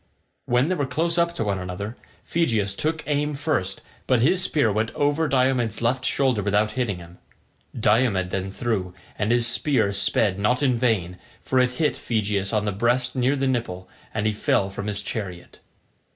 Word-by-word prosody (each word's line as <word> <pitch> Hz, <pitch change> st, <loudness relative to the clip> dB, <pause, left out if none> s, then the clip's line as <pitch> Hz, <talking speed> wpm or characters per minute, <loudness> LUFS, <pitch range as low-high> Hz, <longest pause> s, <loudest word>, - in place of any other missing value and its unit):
When 125 Hz, +3 st, +2 dB
they 185 Hz, -, +1 dB
were 145 Hz, -6 st, -1 dB
close 165 Hz, +5 st, 0 dB
up 170 Hz, 0 st, +1 dB
to -, -, -1 dB
one 100 Hz, -2 st, -1 dB
another, 95 Hz, +5 st, -5 dB, 0.3 s
Phegeus 115 Hz, -12 st, 0 dB
took 160 Hz, +5 st, -1 dB
aim 150 Hz, 0 st, 0 dB
first, 100 Hz, -, -1 dB, 0.3 s
but 130 Hz, -2 st, +3 dB
his 175 Hz, +10 st, +4 dB
spear 150 Hz, -, +2 dB
went 110 Hz, +2 st, 0 dB
over 145 Hz, +2 st, +1 dB
Diomed's 125 Hz, -5 st, +1 dB
left 130 Hz, +3 st, 0 dB
shoulder 130 Hz, -6 st, +2 dB
without 105 Hz, +2 st, +1 dB
hitting 110 Hz, -5 st, -2 dB
him. 85 Hz, 0 st, -13 dB, 0.6 s
Diomed 105 Hz, -4 st, +2 dB
then 95 Hz, 0 st, -2 dB
threw, 95 Hz, -5 st, -2 dB, 0.2 s
and 105 Hz, +2 st, -1 dB
his 120 Hz, -1 st, +3 dB
spear 120 Hz, -3 st, +2 dB
sped 100 Hz, 0 st, +1 dB
not 125 Hz, +7 st, +1 dB
in 130 Hz, -3 st, +3 dB
vain, 105 Hz, -8 st, 0 dB, 0.2 s
for 130 Hz, -, +1 dB
it 125 Hz, 0 st, +4 dB
hit 150 Hz, -3 st, +1 dB
Phegeus 105 Hz, -3 st, -1 dB
on 105 Hz, -2 st, 0 dB
the 105 Hz, -, 0 dB
breast 120 Hz, +5 st, 0 dB
near 130 Hz, +2 st, +2 dB
the 135 Hz, -1 st, -1 dB
nipple, 115 Hz, -8 st, -2 dB, 0.2 s
and 110 Hz, -1 st, -2 dB
he 110 Hz, -, +2 dB
fell 100 Hz, -1 st, +1 dB
from 100 Hz, +1 st, -5 dB
his 105 Hz, -1 st, -2 dB
chariot. 90 Hz, -6 st, -6 dB
115 Hz, 180 wpm, -24 LUFS, 100-130 Hz, 0.6 s, his